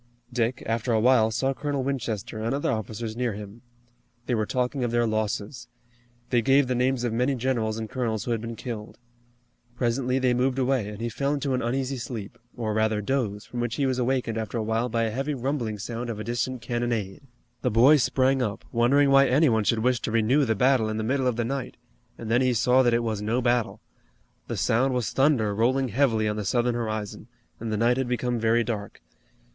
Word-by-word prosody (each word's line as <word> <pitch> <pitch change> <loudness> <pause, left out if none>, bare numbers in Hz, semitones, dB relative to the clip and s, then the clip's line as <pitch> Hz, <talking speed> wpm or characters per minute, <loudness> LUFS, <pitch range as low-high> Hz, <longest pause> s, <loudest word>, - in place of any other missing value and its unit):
Dick, 120 +1 -1
after 115 +2 -1
a 110 - +3
while, 115 -1 +4
saw 130 +4 0
Colonel 140 -1 -2
Winchester, 120 -6 -3
and 115 +4 0
other 145 - 0
officers 110 0 -4
near 120 -2 -1
him. 105 +2 -9 0.6
They 125 - -1
were 110 -2 0
talking 125 +1 -1
of 120 - 0
their 120 0 +1
losses. 110 +2 -2 0.6
They 120 -2 +3
gave 135 +2 +4
the 130 - 0
names 125 0 +1
of 120 -2 -1
many 125 +4 +1
generals 115 -3 -1
and 110 -1 -4
colonels 110 -2 -2
who 120 - -3
had 115 -2 -1
been 115 0 -5
killed. 110 -2 -7 0.8
Presently 125 +1 0
they 130 -2 +2
moved 125 +1 +1
away, 130 -5 +1
and 105 +1 -8
he 120 - -1
fell 140 +5 -1
into 140 -1 -2
an 130 - 0
uneasy 130 +3 -1
sleep, 115 -4 -7 0.2
or 110 -3 -2
rather 110 0 +1
doze, 105 -2 -2
from 120 - -6
which 120 -1 -1
he 140 - 0
was 130 -1 0
awakened 125 -3 0
after 110 +1 -4
a 110 - -1
while 115 +3 0
by 115 0 0
a 110 - -1
heavy 135 +5 -2
rumbling 125 -4 -2
sound 120 +4 -5
of 110 -2 -4
a - - -4
distant 120 +1 -3
cannonade. 120 -4 -2 0.4
The 125 - +1
boy 125 +7 +6
sprang 130 +1 +2
up, 105 -4 -3
wondering 135 +4 +3
why 135 0 +6
any 140 +4 +4
one 110 -2 +1
should 110 0 +1
wish 125 -1 +2
to - - -4
renew 115 +6 +3
the 110 -2 +1
battle 125 0 +3
in 110 - -3
the 110 - -2
middle 130 +3 0
of 125 - +1
the 120 0 -1
night, 135 +1 -4 0.4
and 115 -1 -6
then 120 +2 +4
he 130 -1 +2
saw 125 +3 +4
that 120 -2 +3
it 120 - +1
was 110 -3 -2
no 110 +4 0
battle. 120 -2 0 0.7
The - - -4
sound 130 +3 +2
was 125 -3 -1
thunder 135 -7 +2
rolling 130 +5 +1
heavily 115 -2 +2
on 105 0 -1
the 105 - -2
southern 120 +4 +1
horizon, 110 -2 -4 0.3
and 110 -1 -4
the 105 - 0
night 120 +3 +2
had 130 -1 -1
become 125 -1 -1
very 115 +1 +2
dark. 105 -3 -5
120 Hz, 220 wpm, -26 LUFS, 110-130 Hz, 0.8 s, boy